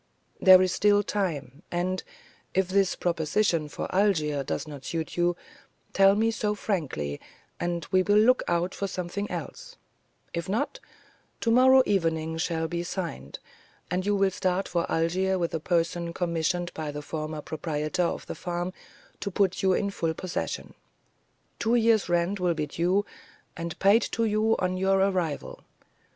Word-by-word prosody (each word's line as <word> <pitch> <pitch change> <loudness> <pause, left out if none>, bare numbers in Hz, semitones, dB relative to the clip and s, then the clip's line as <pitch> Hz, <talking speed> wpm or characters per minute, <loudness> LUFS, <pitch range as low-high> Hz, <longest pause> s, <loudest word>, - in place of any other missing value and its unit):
There 185 -1 +8
is 185 - +1
still 205 +1 +3
time, 160 -9 -3
and, 180 +1 -1 0.5
if 190 -1 +2
this 195 -1 +2
proposition 165 -1 0
for - - -4
Algiers 155 -8 +1
does - - -3
not 145 -3 -9
suit 160 +3 -4
you, 175 0 +2 0.6
tell 195 0 +6
me 225 +2 +2
so 210 -2 -1
frankly, 140 - -3 0.4
and 170 -2 -2
we 185 -1 +5
will 205 +3 +3
look 245 +4 +5
out 175 +2 0
for 200 - -3
something 185 +2 -4
else; - - -7 0.6
if 170 +2 -3
not, 285 - -1 0.6
to 230 - +2
morrow 260 +2 +7
everything 160 -7 0
shall 160 -1 -1
be 170 +1 -3
signed, 170 - -5 0.5
and 180 +1 0
you 205 +1 +1
will 195 -1 +2
start 190 -1 -1
for 170 -1 -1
Algiers 185 +4 +1
with 170 -2 -2
a 160 - -1
person 170 +1 -1
commissioned 175 0 -1
by 155 -1 -4
the 145 0 -6
former 155 +1 -5
proprietor 155 +1 -2
of 175 - -1
the - - -5
farm 175 +1 -4 0.5
to - - -3
put 190 0 +1
you 190 -1 +3
in 200 +2 0
full 165 -4 -2
possession. 185 +1 -4 0.9
Two 230 +1 +2
years' 225 -4 +3
rent 175 +3 +1
will 175 -2 +1
be 155 -1 -1
due, 180 +7 0 0.5
and 170 -2 -5
paid 200 +4 +5
to 230 - +1
you 215 +1 +2
on 185 0 -1
your 190 +1 +2
arrival. 185 -6 -1
180 Hz, 160 wpm, -27 LUFS, 165-200 Hz, 0.9 s, There